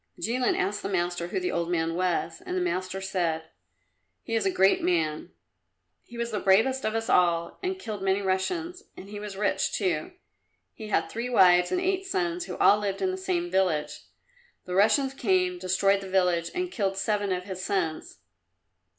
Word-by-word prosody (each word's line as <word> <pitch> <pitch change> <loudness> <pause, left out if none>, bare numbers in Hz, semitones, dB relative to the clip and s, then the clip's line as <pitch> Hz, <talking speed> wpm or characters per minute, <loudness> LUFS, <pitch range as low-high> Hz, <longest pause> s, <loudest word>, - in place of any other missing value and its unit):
Jilin 245 +2 0
asked 205 +3 -1
the - - -4
master 175 -2 -1
who 175 - -2
the 365 0 -2
old 170 0 -1
man 165 -1 0
was, 180 - -1
and 365 -1 -3
the - - +2
master 190 - -2
said, 165 -4 -2 0.7
"He 230 - -6
is 220 -3 +1
a - - +2
great 190 +1 +3
man! 160 -4 0 0.7
He 240 - -13
was 235 0 -2
the 210 - -1
bravest 225 +8 +3
of 215 +1 -1
us 225 0 -2
all, 170 -2 +2
and 375 0 -2
killed 215 - -6
many 190 0 +1
Russians, 335 - -2 0.2
and 195 - -10
he 205 0 -7
was 205 -2 -7
rich, 195 -1 0
too. 175 - -1 0.6
He 220 - -9
had 210 - +1
three 235 +2 -4
wives 180 -6 +5
and 365 - +1
eight 380 +1 -1
sons, 360 -2 -1
who - - -6
all 205 - +5
lived 200 -2 -3
in 375 - +1
the - - -3
same 365 -2 -2
village. 175 -6 0 0.7
The 180 - -5
Russians 265 +8 +3
came, 185 -7 +1
destroyed 195 +2 +2
the 195 - -8
village, 180 -3 +1
and 360 0 -2
killed 195 - -1
seven 205 0 0
of 180 0 -1
his 185 -1 -6
sons. 165 - -3
195 Hz, 190 wpm, -27 LUFS, 180-245 Hz, 0.7 s, wives